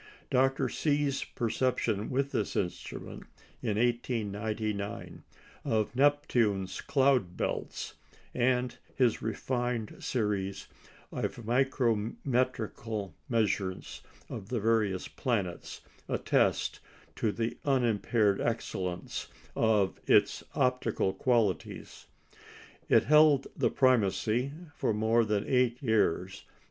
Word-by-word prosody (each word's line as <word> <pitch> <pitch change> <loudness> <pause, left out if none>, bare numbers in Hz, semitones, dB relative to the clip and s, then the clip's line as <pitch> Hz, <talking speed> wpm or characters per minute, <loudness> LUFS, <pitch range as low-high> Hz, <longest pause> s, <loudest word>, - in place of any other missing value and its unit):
Dr. 135 +1 +3
See's 145 +1 0
perception 115 -3 -1
with 140 +2 0
this 105 - -1
instrument, 90 -2 -4 0.3
in 105 -1 -1
1899, 110 -3 -2 0.4
of 110 +1 0
Neptune's 120 -9 +2
cloud 130 - +2
belts, - - -3 0.4
and 125 0 +1 0.2
his 125 -4 +2
refined 120 0 -2
series 100 -5 -1 0.5
of 120 - -4
micrometrical 115 - 0 0.2
measures 105 -5 -1 0.3
of 95 - -7
the 125 - -1
various 105 -4 +1
planets, 100 -9 -3 0.3
attest - - +1 0.4
the 115 +1 -1
unimpaired 115 -6 +2
excellence 95 -6 -3 0.3
of 105 -4 +2
its - - +4
optical 125 -6 +1
qualities. 110 -2 -1 0.8
It - - +6
held 150 -2 +5
the - - +2
primacy 125 0 +2 0.2
for 110 - 0
more 110 +2 +3
than 105 -2 -1
eight 125 -2 +2
years. 100 -5 +1
115 Hz, 90 wpm, -30 LUFS, 105-125 Hz, 0.8 s, It